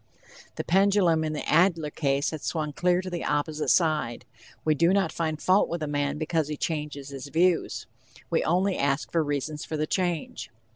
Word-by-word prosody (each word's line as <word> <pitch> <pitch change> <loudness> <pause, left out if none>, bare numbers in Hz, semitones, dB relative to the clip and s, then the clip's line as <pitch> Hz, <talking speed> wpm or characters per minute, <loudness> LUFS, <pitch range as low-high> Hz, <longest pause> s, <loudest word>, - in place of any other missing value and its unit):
The - - -3
pendulum 190 -3 +3
in 155 0 -2
the 150 - -4
Adler 165 -2 +3
case 140 -2 0
has 155 -2 -6
swung 155 -3 -2
clear 180 +3 +1
to 185 - -5
the 175 - -3
opposite 150 +1 -1
side. 155 -8 +1 0.4
We 155 - +4
do 170 +5 +3
not 200 -1 +2
find 155 -2 -2
fault 185 +4 +3
with 170 -1 -3
a - - -2
man 145 0 -1
because 155 -1 0
he 150 -1 -4
changes 150 -3 -4
his 140 0 -7
views, 170 +4 +1 0.5
we - - +2
only 185 +3 +1
ask 140 +1 0
for 165 -2 +2
reasons 145 +1 -3
for 155 - -4
the 155 - 0
change. 175 -1 -2
155 Hz, 190 wpm, -26 LUFS, 150-175 Hz, 0.5 s, We